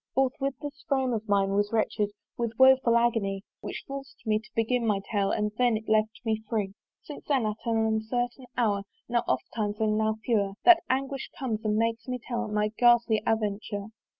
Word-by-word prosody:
Forthwith 270 +1 +1
this 290 +1 -7
frame 265 -3 +1
of 220 -1 -4
mine 195 -1 +3
was 205 +1 +1
wrench'd 220 0 0 0.4
With 235 -2 -2
a - - -34
woeful 260 -3 +6
agony, 215 -5 +1 0.2
Which - - -6
forc'd 275 -1 -8
me 215 -1 +2
to 215 - -17
begin 235 +2 +1
my 205 -2 +2
tale 200 -2 +1
And 210 0 0
then 245 -3 +3
it 220 - -10
left 215 0 +1
me 220 -1 0
free. 205 -4 -1 0.3
Since 295 - -9
then 270 -6 +2
at 215 0 -2
an 225 -1 +2
uncertain 245 +3 -1
hour, 210 -5 +2 0.3
Now 235 0 +2
oftimes 210 -1 -2
and 215 -1 +2
now 220 0 +1
fewer, 205 -5 +1
That 350 -1 +8
anguish 270 +1 -1
comes 225 -5 -3
and 215 -1 +1
makes 230 +1 0
me 250 0 -2
tell 240 -1 -4
My 210 0 0
ghastly 240 -2 +5
aventure. 205 -1 -1
225 Hz, 190 wpm, -28 LUFS, 215-250 Hz, 0.4 s, That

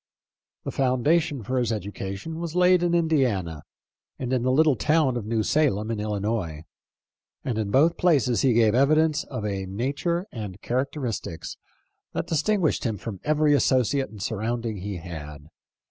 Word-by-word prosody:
The - - -4
foundation 135 +1 +1
for 130 +5 -1
his 120 -1 0
education 100 - -5
was 170 -1 -5
laid 180 0 +5
in 175 -1 +2
Indiana 125 - +1 0.6
and 130 0 -3
in 130 - +1
the 130 +1 +1
little 150 +1 +4
town 150 +2 +2
of 115 -4 -4
New 110 -1 0
Salem 115 -6 +1
in 110 - -2
Illinois, 105 -6 -2 0.8
and 120 -4 -1
in 105 -2 -2
both 155 +9 +3
places 140 -9 +3
he 130 -3 +3
gave 110 -2 +4
evidence 155 +4 +3
of 125 -6 -5
a 100 -2 -3
nature 140 - -2
arid 105 -4 -7
characteristics 125 - -3 0.6
that - - -2
distinguished 165 +2 +1
him 110 -4 -1
from 100 -2 -7
every 150 0 +3
associate 135 -1 +2
and 105 -3 -8
surrounding 115 +1 -2
he 100 0 -5
had. 75 -3 -9
125 Hz, 155 wpm, -25 LUFS, 105-150 Hz, 0.8 s, laid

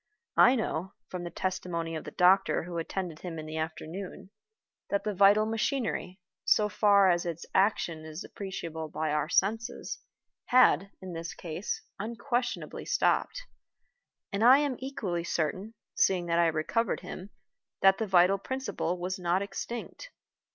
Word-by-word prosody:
I 250 - +7
know 190 -5 -2 0.2
(from 180 -1 -5
the - - -4
testimony 170 -2 -3
of 155 - -5
the - - -5
doctor 190 0 +4
who 170 0 -4
attended 170 -1 -4
him 175 -3 -6
in 155 - -6
the 155 0 -6
afternoon) 160 +5 -6 0.6
that 200 - 0
the 210 - -1
vital 200 +2 +5
machinery, 220 -4 -2 0.2
so 210 -1 +3
far 200 -2 +5
as 175 0 +1
its 170 -1 -5
action 185 -5 +1
is 155 +2 -7
appreciable 165 -5 -6
by 155 0 -2
our 150 0 0
senses, 225 +6 0 0.5
had, 200 -8 +5
in 185 -1 -6
this 165 0 -5
case, 170 +3 -4 0.2
unquestionably 240 +3 -3
stopped, - - +1 0.9
and 200 +2 0
I 255 +3 +9
am 285 -3 0
equally 205 -10 -3
certain 185 +7 -2 0.2
(seeing 180 -2 +2
that 170 0 +1
I 170 - +5
recovered 165 +8 0
him) 185 +2 -8 0.5
that 195 0 +6
the 220 - -1
vital 185 +1 +5
principle 260 -7 -3
was 185 +2 -3
not 180 +2 +1
extinct. 235 - -6
185 Hz, 150 wpm, -29 LUFS, 170-215 Hz, 0.9 s, I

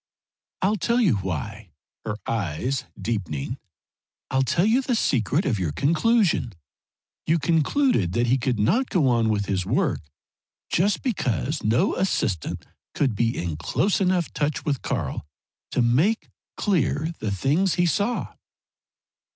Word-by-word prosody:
"I'll 205 +3 +2
tell 235 +6 +1
you 180 - +3
why!" 95 +3 -5 0.4
her 105 -1 -3
eyes 115 - -2
deepening. 100 - -3 0.7
"I'll 130 0 +2
tell 165 +7 +2
you 230 +5 +3
the 255 -2 0
secret 140 - +1
of 110 -8 0
your 85 -5 -1
conclusion. 165 - +2 0.7
You 165 - +3
concluded 165 - +1
he 120 +2 +2
could 125 -1 0
not 225 - +2
go 170 -9 +2
on 115 -3 +2
with 105 -2 0
his 95 -2 -1
work 130 - 0 0.7
just 195 +3 +1
because 150 - -1
no 115 - +2
assistant 105 - -1 0.3
could 135 -5 +1
be 115 +3 0
in 85 -3 -3
close 190 - 0
enough 180 -3 +1
touch 150 0 -1
with 140 -4 -1
Karl - - -3 0.5
to 125 - +1
make 150 - +2 0.3
clear 165 -4 0
the 110 - -2
things 145 - +1
he 175 - +2
saw." 205 +8 0
135 Hz, 135 wpm, -24 LUFS, -, 0.7 s, you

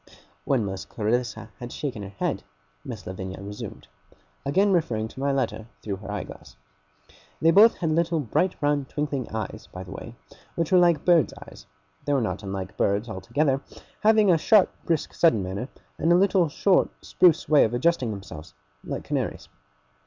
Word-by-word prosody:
When 125 -6 +1
Miss 95 -1 -4
Clarissa 120 +3 -2
had 120 0 -7
shaken 130 -8 -4
her 100 - -7
head, 100 - -2 0.4
Miss 115 -7 -8
Lavinia 95 0 -6
resumed: 100 +1 -8 0.6
again 190 +9 +2
referring 115 -11 0
to 130 - -12
my 140 +1 +1
letter 120 -5 -2 0.2
through 100 -3 -3
her 100 +1 -8
eye 105 - -3
glass. - - -13 0.8
They 165 - +4
both 215 +6 +7
had 165 -3 -1
little 165 +1 +1
bright 155 - 0
round 145 -2 +1
twinkling 145 -4 -3
eyes, 110 -1 -5
by 90 - -7
the 95 - -11
way, 115 +4 -8 0.4
which 165 -2 -1
were 185 - +6
like 170 -4 +3
birds' 170 -4 +4
eyes. - - -14 0.4
They 145 - +1
were 140 - +3
not 110 - -2
unlike 95 -2 -6
birds, 105 +4 +1
altogether; 130 +8 0 0.4
having 215 -2 +5
a 165 - +4
sharp, 205 +3 +5
brisk, 165 -3 -1
sudden 115 - +3
manner, 100 +8 -4 0.3
and 165 - +2
a - - +7
little 185 -2 +3
short, 190 +5 +3 0.2
spruce 175 -4 +3
way 150 -1 +6
of 115 +2 0
adjusting 130 -1 +1
themselves, 90 -7 -8 0.3
like - - -5
canaries. - - -3
130 Hz, 175 wpm, -25 LUFS, 105-165 Hz, 0.8 s, both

